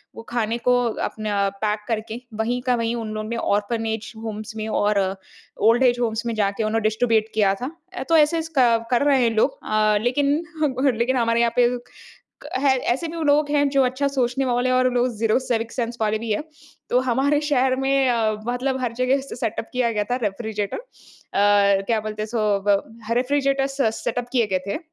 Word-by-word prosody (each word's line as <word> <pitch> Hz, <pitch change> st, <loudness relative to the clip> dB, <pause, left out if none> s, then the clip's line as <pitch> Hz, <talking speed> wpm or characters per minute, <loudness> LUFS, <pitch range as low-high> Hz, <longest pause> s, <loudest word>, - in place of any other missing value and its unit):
वो -, -, -8 dB
खाने 230 Hz, -1 st, -1 dB
को 250 Hz, +1 st, +2 dB, 0.3 s
अपना 205 Hz, -2 st, -1 dB
पैक 210 Hz, 0 st, 0 dB
करके 225 Hz, 0 st, -3 dB, 0.2 s
वहीं 240 Hz, +3 st, -1 dB
का 250 Hz, -, +4 dB
वहीं 230 Hz, 0 st, -1 dB
उन 225 Hz, -2 st, -4 dB
लोगों 215 Hz, 0 st, -4 dB
ने 235 Hz, -, -2 dB
ऑर्फ़नेज 220 Hz, +1 st, -1 dB
होम्स 215 Hz, 0 st, -6 dB
में 215 Hz, -, -3 dB
और 210 Hz, -1 st, +1 dB, 0.7 s
ओल्ड 230 Hz, +4 st, +5 dB
एज 245 Hz, -1 st, +3 dB
होम्स 230 Hz, -1 st, -1 dB
में 235 Hz, -, -1 dB
जाके 205 Hz, +1 st, 0 dB
उन्हें 220 Hz, +1 st, 0 dB
डिस्ट्रिब्यूट 220 Hz, 0 st, +2 dB
किया 205 Hz, -3 st, +3 dB
था। 250 Hz, +6 st, -5 dB, 0.2 s
अ, 260 Hz, -, -4 dB
तो 330 Hz, -, +5 dB
ऐसे-ऐसे 320 Hz, +1 st, +2 dB
क 230 Hz, -2 st, +4 dB
कर 245 Hz, +2 st, +3 dB
रहे 275 Hz, -3 st, +4 dB
हैं 230 Hz, -, +3 dB
लोग। 220 Hz, -, +2 dB
अ, 215 Hz, -1 st, +2 dB
लेकिन 280 Hz, +4 st, +1 dB, 0.3 s
हम 285 Hz, -4 st, +1 dB
हर 265 Hz, -, +4 dB
लेकिन 245 Hz, +3 st, +1 dB
हमारे 230 Hz, -1 st, +2 dB
यहाँ 235 Hz, -1 st, +2 dB
पे 245 Hz, -1 st, +5 dB, 0.5 s
क -, -, -10 dB
है 270 Hz, -1 st, +3 dB, 0.2 s
ऐसे 320 Hz, +7 st, -3 dB
भी 330 Hz, 0 st, -5 dB
लोग 290 Hz, 0 st, +3 dB
हैं 290 Hz, -1 st, +3 dB
जो 275 Hz, -1 st, +3 dB
अच्छा 260 Hz, +3 st, 0 dB
सोचने 265 Hz, -1 st, 0 dB
वाले 245 Hz, 0 st, +1 dB
हैं 255 Hz, -, +3 dB
और 255 Hz, 0 st, +3 dB
लोग 245 Hz, +1 st, +2 dB
0 220 Hz, +1 st, +2 dB
सिविक 235 Hz, -3 st, -2 dB
सेंस 235 Hz, -1 st, -3 dB
वाले 215 Hz, 0 st, +1 dB
भी 225 Hz, 0 st, -5 dB
हैं। 210 Hz, -, -1 dB, 0.5 s
तो 250 Hz, -, +4 dB
हमारे 280 Hz, +4 st, +2 dB
शहर 260 Hz, -2 st, +2 dB
में 270 Hz, 0 st, +2 dB
अ, 225 Hz, -2 st, +1 dB, 0.2 s
मतलब 260 Hz, +2 st, -1 dB
हर 240 Hz, -, -1 dB
जगह 255 Hz, +3 st, +1 dB
से 270 Hz, -, -9 dB
सेटअप 225 Hz, -1 st, -3 dB
किया 250 Hz, -2 st, +1 dB
गया 210 Hz, -1 st, 0 dB
था -, -, +2 dB
रेफ़्रिज़रेटर। 210 Hz, 0 st, -3 dB
अ, -, -, -6 dB, 1.1 s
क्या 225 Hz, -2 st, +1 dB
बोलते 215 Hz, 0 st, -5 dB
हैं -, -, -1 dB
इसको? 215 Hz, -3 st, 0 dB
ब 200 Hz, -1 st, +4 dB, 0.3 s
ह -, -, +2 dB
रेफ़्रिज़रेटर। 275 Hz, +1 st, +1 dB
स 270 Hz, -5 st, 0 dB
सेटअप 245 Hz, -1 st, -2 dB
किए 235 Hz, -4 st, +2 dB
गए 185 Hz, -, +3 dB
थे, 200 Hz, -, -2 dB
235 Hz, 210 wpm, -22 LUFS, 220-260 Hz, 1.1 s, ओल्ड